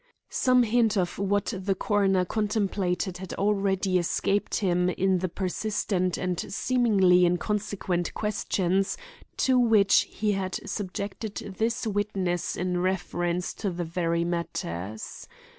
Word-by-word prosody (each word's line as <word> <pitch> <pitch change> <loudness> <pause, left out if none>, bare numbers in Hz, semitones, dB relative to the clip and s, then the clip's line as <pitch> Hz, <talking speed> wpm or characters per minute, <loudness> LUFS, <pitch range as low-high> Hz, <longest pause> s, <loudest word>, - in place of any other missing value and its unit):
Some 255 -1 +4
hint 225 -2 +2
of 180 -1 -1
what 205 +2 0
the 190 +1 -1
coroner 195 -2 +2
contemplated 195 -3 -1
had 190 -1 -6
already 195 -2 +1
escaped 195 +4 0
him 180 -3 +1
in 185 0 +1
the 185 0 -2
persistent 185 -1 -1
and 180 -1 -2
seemingly 195 -6 +3
inconsequent 185 -1 0
questions 195 -2 0 0.4
to 260 -1 +3
which 220 -5 +4
he 210 -1 -1
had 190 -2 -2
subjected 200 +1 -4 0.2
this 230 +1 0
witness 195 -4 -1
in 180 0 -1
reference 180 -1 -1
to 200 - -3
these 175 -1 -3
very 170 0 0
matters. 110 - -4
190 Hz, 120 wpm, -27 LUFS, 180-210 Hz, 0.4 s, Some